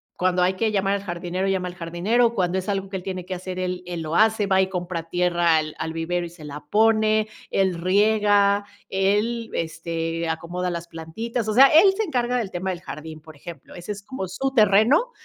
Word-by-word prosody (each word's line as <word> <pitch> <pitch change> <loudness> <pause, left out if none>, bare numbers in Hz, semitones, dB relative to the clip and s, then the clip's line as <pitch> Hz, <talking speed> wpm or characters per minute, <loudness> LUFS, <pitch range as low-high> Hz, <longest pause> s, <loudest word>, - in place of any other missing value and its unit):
cuando 180 0 +1
hay 180 +1 +3
que 220 +2 0
llamar 195 -1 +1
al 200 - -5
jardinero 180 +1 -3
llama 190 -2 0
al 180 - -8
jardinero, 190 +8 +1
cuando 185 -3 0
es 190 +2 -4
algo 195 -1 -2
que 195 - -4
él 180 - -9
tiene 185 -1 -5
que 185 +1 -5
hacer, 185 0 -6
él 180 0 -3
él 175 -1 -5
lo 160 +1 -4
hace 220 0 +3
va 190 -1 +3
y 190 - +1
compra 175 -2 -4
tierra 175 -2 +2
al 155 -1 -3
al 160 - -4
vivero 175 +2 -2
y - - -7
se 170 -2 -14
la 150 0 -8
pone, 215 0 +3 0.2
él 190 -2 +1
riega, 205 +2 +3 0.2
él 210 +5 0
este 165 0 -3
acomoda 175 +3 -3
las 170 0 -5
plantitas, 215 +9 -5
o 215 - 0
sea, 265 +5 +8
él 345 +7 +6
se 440 - -1
encarga 250 - -1
del 225 -5 -2
tema 185 +1 -3
del 175 -1 -6
jardín, 155 0 -8
por 155 0 -14
ejemplo, 165 +4 -11
ese 175 +3 -7
es 205 -1 -6
como 200 -2 -6
su 265 +10 -2
terreno 220 - +4
185 Hz, 215 wpm, -23 LUFS, 170-215 Hz, 0.2 s, sea